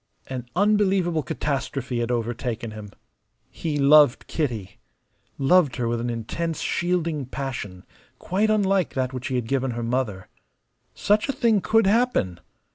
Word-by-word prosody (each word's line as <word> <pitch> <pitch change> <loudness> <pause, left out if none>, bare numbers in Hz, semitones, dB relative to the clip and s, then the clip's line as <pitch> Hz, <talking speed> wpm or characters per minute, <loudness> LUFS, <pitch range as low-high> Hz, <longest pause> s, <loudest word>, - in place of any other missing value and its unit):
An 125 -2 -6
unbelievable 195 -4 +2
catastrophe 135 -4 -3
had 120 0 -1
overtaken 120 -1 -3
him. 105 -1 -9 0.6
He 155 -3 -3
loved 145 -2 +5
Kitty, 115 - -3 0.6
loved 145 0 +3
her 120 - -1
with 115 0 -1
an 120 - -2
intense, 150 +8 -3
shielding 170 -6 -1
passion, 125 -9 -5 0.3
quite 205 +4 0
unlike 195 -4 +1
that 130 -1 -1
which 125 -1 -4
he 130 - -2
had 125 -2 -1
given 135 0 0
her 120 - -3
mother. 115 -6 -2 0.7
Such 210 +5 +1
a - - +1
thing 230 -7 +2
could 225 +2 +3
happen! 200 - +1
135 Hz, 140 wpm, -24 LUFS, 120-180 Hz, 0.7 s, loved